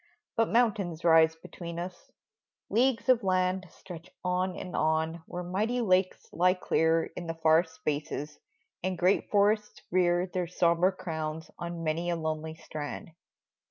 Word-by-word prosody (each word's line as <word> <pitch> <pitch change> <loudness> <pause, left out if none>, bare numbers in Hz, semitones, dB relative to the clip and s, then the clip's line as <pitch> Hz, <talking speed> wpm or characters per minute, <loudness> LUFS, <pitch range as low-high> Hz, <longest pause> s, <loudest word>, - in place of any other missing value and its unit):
But 225 0 +2
mountains 200 -8 +1
rise 160 -1 +6
between 170 +1 -8
us; 175 +1 -7 0.6
leagues 245 +4 +2
of 250 -3 +4
land 185 0 +1
Stretch 175 0 -11
on 180 0 0
and 180 - -6
on 160 +1 0
where 180 0 -5
mighty 210 +8 -1
lakes 185 -4 +1
lie 180 +2 +3
clear 165 -2 +1
In 175 - -6
the 165 - -3
far 160 +1 +4
spaces, 150 -2 -4 0.4
and 185 0 -2
great 180 +3 +2
forests 210 +1 +2
rear 175 0 +3
Their 180 -1 -3
sombre 170 +1 +3
crowns 160 -4 -5
on 170 -1 -5
many 165 +2 -1
a 170 - +1
lonely 160 -1 -3
strand 155 0 -7
175 Hz, 145 wpm, -29 LUFS, 160-185 Hz, 0.6 s, rise